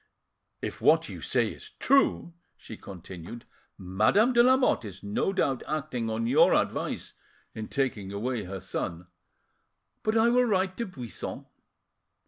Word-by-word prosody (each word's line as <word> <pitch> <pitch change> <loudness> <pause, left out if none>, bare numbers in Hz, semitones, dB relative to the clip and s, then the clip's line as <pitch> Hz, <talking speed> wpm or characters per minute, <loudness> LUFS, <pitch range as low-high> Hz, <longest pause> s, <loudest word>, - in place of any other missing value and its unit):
"If - - -5
what - - +4
you - - -8
say - - +1
is - - -10
true," 275 -10 +2 0.2
she 110 - -10
continued, 95 +3 -10 0.3
"Madame 110 - +2
de 235 - +6
Lamotte 255 - +4
is 100 -2 -9
no 105 - 0
doubt 140 -9 0
acting 140 -7 -2
on 110 +1 -1
your 115 - +5
advice - - -2 0.4
in 110 -1 -6
taking 115 -8 -2
away 110 +1 -2
her 95 +1 -6
son. 85 -1 -4 1.0
But 215 +1 +1
I 225 +1 +5
will 250 +1 +4
write 190 -4 +1
to 235 - -2
Buisson." 125 - -7
120 Hz, 140 wpm, -28 LUFS, -, 1.0 s, de